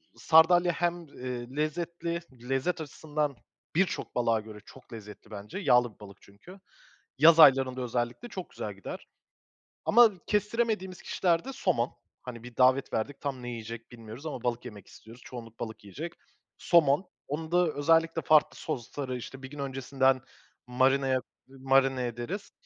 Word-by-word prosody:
sardalya 175 +2 +5
hem, 175 -1 -2
eee, 125 -1 -7
lezzetli, 170 +2 -2 0.3
lezzet 150 +6 0
açısından 150 -1 -3 0.4
birçok 190 +2 0
balığa 115 -2 +2
göre 105 0 -10
çok 130 -2 -15
lezzetli 105 -1 -11
bence. 105 - -7
Yağlı 125 - +3
bir - - -32
balık 100 -2 -12
çünkü. 140 - -15 0.6
Yaz 165 +3 +7
aylarında 130 -3 +6
özellikle 120 - -3
çok 185 -5 -7
güzel 105 -1 -6
gider 95 - -8 0.8
ama 235 0 +7 0.2
kestiremediğimiz 210 -3 -1
kişilerde 175 +8 0
somon. 120 - 0 0.3
Hani, 120 -2 -8
bir 120 -1 -12
davet 130 +1 +3
verdik 135 +6 -3
tam 135 -3 -4
ne 120 - -5
yiyecek 115 0 -7
bilmiyoruz 115 +4 -10
ama 135 -6 -5
balık 120 0 -2
yemek 105 -5 -10
istiyoruz, 115 +3 -15
çoğunluk 115 -2 -10
balık 110 -2 -6
yiyecek. 150 - -7 0.4
Somon, 170 +1 +3 0.2
onu 160 +3 -4
da 175 0 +4
özellikle 165 +2 +2
farklı 155 -1 +4
sosları, 130 +1 -4
işte, 135 +2 -9
bir 130 - -7
gün 145 +1 -10
öncesinden 135 -1 +1 0.5
marinaya, 130 +1 +2 0.3
marine 135 -1 +2
ederiz. 120 - -5
135 Hz, 145 wpm, -29 LUFS, 120-165 Hz, 0.8 s, Yaz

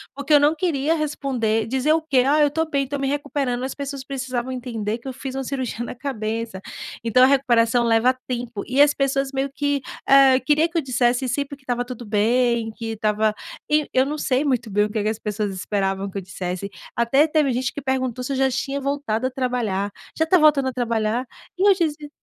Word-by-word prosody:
porque 280 +2 -1
eu 290 - +8
não 295 +2 +3
queria 315 -2 0
responder, 250 -8 -1
dizer 265 +5 +2
o 325 - +2
quê? 270 -5 +2
"Ah, 300 +2 +4
eu 295 - +6
estou 320 +2 -1
bem, 280 -3 0
estou 285 +2 -4
me 275 - -1
recuperando", 275 -3 -2
as 265 - -4
pessoas 280 -1 -5
precisavam 260 -2 -4
entender 230 -4 -3
que 245 - -12
eu 260 - -4
fiz 265 0 -6
uma 270 - -2
cirurgia 255 -3 -3
na - - -6
cabeça, 225 -5 -4 0.4
então 235 +2 +3
a - - +8
recuperação 240 -3 +3
leva 230 +3 +3
tempo, 240 -4 -4
e 265 +3 +3
as 290 0 +5
pessoas 275 0 0
meio 270 0 -2
que, 285 0 0 0.3
eh, 270 -1 +7
queria 300 +5 +2
que 340 - -26
eu - - -1
dissesse 250 -1 +1
sempre 280 +2 -2
que 275 - -26
estava 245 -1 -2
tudo 250 -1 -8
bem, 230 +2 +1
que 225 0 -5
estava 215 0 +1 0.4
e 300 -1 +2
eu 260 +1 +3
não 300 +1 -3
sei 265 0 +1
muito 240 -6 -1
bem 210 +1 +3
o - - -4
que 215 -2 -1
que 215 - +1
as 220 0 -3
pessoas 210 -1 -3
esperavam 195 0 -2
que 195 - -7
eu 195 - -2
dissesse, 185 +1 -5 0.3
até 270 +6 +3
teve 300 -3 +2
gente 250 +1 -1
que 285 - -6
perguntou 260 -2 -2
se 275 - -4
eu - - -2
já 265 0 +3
tinha 275 +2 -2
voltado 275 -4 -1
a - - -2
trabalhar, 230 -7 -1 0.3
"já 320 - +3
está 360 +3 +4
voltando 285 -4 +4
a - - -7
trabalhar?", 230 0 -1 0.3
e 390 - +3
eu 400 - +8
dizia 305 -4 -2
255 Hz, 225 wpm, -22 LUFS, 230-280 Hz, 0.4 s, eu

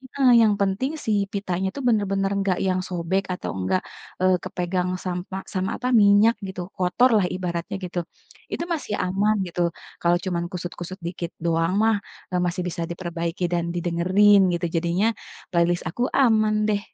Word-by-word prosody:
heeh, 270 -2 +4
yang 215 -2 +5
penting, 200 +8 0
si 220 - 0 0.2
pitanya 190 -2 -1
itu 280 - -4
benar-benar 195 -3 +1
enggak 195 -2 +1
yang 185 0 +1
sobek, 180 +2 -1
atau 180 - -4
enggak, 95 - 0 0.4
eee, 185 -1 +4
kepegang 180 0 -2 0.2
sampa 185 +1 -4
sama 185 0 -1
apa, 250 - -3
minyak, 205 +3 +5
gitu, 190 -1 -5 0.2
kotor 185 +8 +3
lah, 195 - +2
ibaratnya 175 -1 -3
gitu. 180 0 -3 0.5
Itu, - - -2
masih 285 -9 -3
aman, 200 +4 +1
gitu, 175 0 -3 0.4
kalau 170 0 +3
cuman 175 -2 -1
kusut-kusut 180 +1 -6
dikit 170 0 -5
doang 165 +1 +1
mah, 225 0 +4 0.4
eee, 180 - +1
masih 180 +1 -1
bisa 170 -1 -3
diperbaiki 170 0 -4
dan 170 -1 +1
didengerin, 185 +4 +4 0.2
gitu. 170 - -2
Jadinya, 170 +5 +1 0.4
playlist 175 0 +2
aku, 240 +9 -2 0.2
aman 215 -4 +4
deh, 205 -1 +2
185 Hz, 160 wpm, -24 LUFS, 175-200 Hz, 0.5 s, yang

